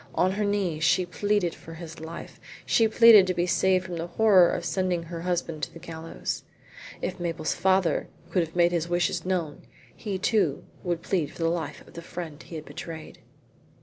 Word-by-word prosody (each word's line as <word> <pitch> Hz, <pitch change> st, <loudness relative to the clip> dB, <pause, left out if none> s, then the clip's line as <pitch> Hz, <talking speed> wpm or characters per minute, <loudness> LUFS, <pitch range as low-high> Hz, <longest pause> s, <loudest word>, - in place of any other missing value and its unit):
On 185 Hz, -, +3 dB
her 205 Hz, +2 st, -1 dB
knees 195 Hz, -6 st, 0 dB
she 180 Hz, +2 st, +3 dB
pleaded 205 Hz, 0 st, 0 dB
for 165 Hz, -, -11 dB
his 165 Hz, -1 st, -9 dB
life; 160 Hz, +1 st, -8 dB, 0.3 s
she 225 Hz, -, +4 dB
pleaded 220 Hz, -3 st, +8 dB
to 185 Hz, -, 0 dB
be 175 Hz, 0 st, +1 dB
saved 185 Hz, +1 st, +2 dB
from 180 Hz, -2 st, -5 dB
the 165 Hz, +1 st, -3 dB
horror 190 Hz, -1 st, +5 dB
of 175 Hz, -, -2 dB
sending 180 Hz, -2 st, 0 dB
her 165 Hz, 0 st, -7 dB
husband 170 Hz, -3 st, -2 dB
to -, -, -3 dB
the -, -, -11 dB
gallows. 165 Hz, 0 st, -5 dB, 0.6 s
If -, -, -3 dB
Mabel's 165 Hz, -2 st, -2 dB
father 190 Hz, -2 st, +2 dB, 0.2 s
could 165 Hz, -2 st, 0 dB
make 175 Hz, 0 st, +4 dB
his 170 Hz, -1 st, -1 dB
wishes 175 Hz, -1 st, 0 dB
known 170 Hz, -6 st, -2 dB, 0.3 s
he 205 Hz, -4 st, -4 dB
too 185 Hz, -, +1 dB, 0.2 s
would 175 Hz, -2 st, -2 dB
plead 165 Hz, -7 st, 0 dB
for 165 Hz, -, -5 dB
the 165 Hz, -, +3 dB
life 160 Hz, -4 st, -4 dB
of -, -, -16 dB
the 170 Hz, -, -7 dB
friend 170 Hz, -3 st, -7 dB
he 165 Hz, -, -10 dB
had 155 Hz, -1 st, -6 dB
betrayed. 160 Hz, -2 st, -8 dB
175 Hz, 190 wpm, -26 LUFS, 165-185 Hz, 0.6 s, pleaded